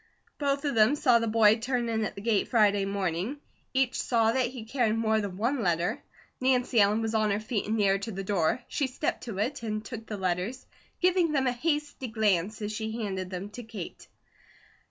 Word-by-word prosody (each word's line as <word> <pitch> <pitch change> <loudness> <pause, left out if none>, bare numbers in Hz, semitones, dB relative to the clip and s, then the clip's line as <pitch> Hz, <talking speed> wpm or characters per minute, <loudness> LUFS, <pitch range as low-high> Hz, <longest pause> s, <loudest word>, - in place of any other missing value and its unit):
Both 280 0 0
of 285 - 0
them 225 +5 +5
saw 250 -5 +4
the 230 - -1
boy 220 0 +5
turn 245 +1 -1
in 220 -1 0
at - - -5
the 200 - -7
gate 215 -1 +1
Friday 205 -4 +3
morning. 195 - -2 0.3
Each 260 -1 +1
saw 225 -2 +2
that 255 +1 +1
he 240 -3 -8
carried 225 -2 +1
more 220 -1 +2
than 195 -3 -5
one 240 +5 0
letter. 175 -3 0 0.4
Nancy 255 -3 +3
Ellen 210 +3 +3
was 225 0 -2
on 215 -1 +2
her 200 0 +1
feet 215 -1 -3
and 220 +1 0
nearer 195 -2 +3
to 225 +3 -5
the 195 -1 -5
door; 195 +4 0
she 280 - -1
stepped 260 +2 -3
to 225 -6 -5
it, 245 +7 -1
and 215 -1 -3
took 225 -2 -7
the 210 - -4
letters, 190 +7 -2 0.4
giving 360 -3 +3
them 270 -2 +2
a 250 - +3
hasty 295 0 -2
glance 215 -2 0
as 210 - -2
she 220 +1 -3
handed 190 -3 -3
them 190 +2 -6
to 245 - -7
Kate. 220 -6 -8
220 Hz, 210 wpm, -28 LUFS, 205-250 Hz, 0.4 s, them